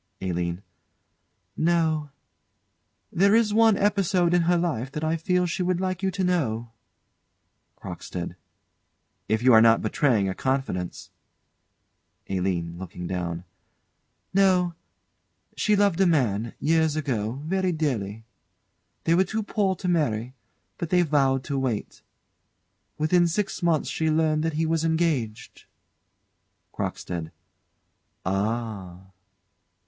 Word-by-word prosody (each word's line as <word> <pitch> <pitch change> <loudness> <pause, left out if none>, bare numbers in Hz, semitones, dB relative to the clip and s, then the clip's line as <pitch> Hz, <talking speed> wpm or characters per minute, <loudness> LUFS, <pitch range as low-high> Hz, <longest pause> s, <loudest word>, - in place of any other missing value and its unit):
ALINE. 90 0 -3 0.9
No. 160 -3 +1 1.0
There 200 +4 +4
is 225 -2 +3
one 225 -2 +5
episode 190 -4 +2
in 175 - +4
her 175 - +4
life 135 -7 -2
that 150 - -4
I 160 +1 +1
feel 180 +2 +1
she 175 +1 -2
would 180 -1 0
like 185 -1 -2
you 190 - +1
to 190 0 -2
know 120 -11 0 1.1
CROCKSTEAD. - - -6 0.9
If 110 +2 +1
you 130 -1 +6
are 110 - +8
not 115 0 +5
betraying 110 -2 +2
a 95 - -1
confidence 130 -9 -3 1.2
ALINE. 90 -3 -2
[Looking 90 -1 -7
down.] 85 -1 -3 0.9
No. 185 -3 +3 0.8
She 210 - +2
loved 200 -3 +2
a 190 - +5
man, 115 - +1
years 160 -1 +2
ago, 120 -8 -1
very 185 +2 0
dearly. 115 - -2 0.8
They 165 - +2
were 180 +3 +5
too 215 +4 -3
poor 200 -2 0
to 185 - -5
marry, 130 -9 0 0.5
but 170 - -3
they 180 0 +4
vowed 135 -4 +2
to 140 0 -2
wait. 125 -6 -3 1.0
Within 170 +3 +3
six 195 +3 -2
months 170 -3 +1
she 160 0 -1
learned 155 -1 +2
that 160 0 -1
he 160 +2 0
was 160 0 0
engaged. 160 -10 -1 1.1
CROCKSTEAD. 85 -3 -4 0.9
Ah! 100 -2 -2
155 Hz, 120 wpm, -25 LUFS, 110-180 Hz, 1.2 s, are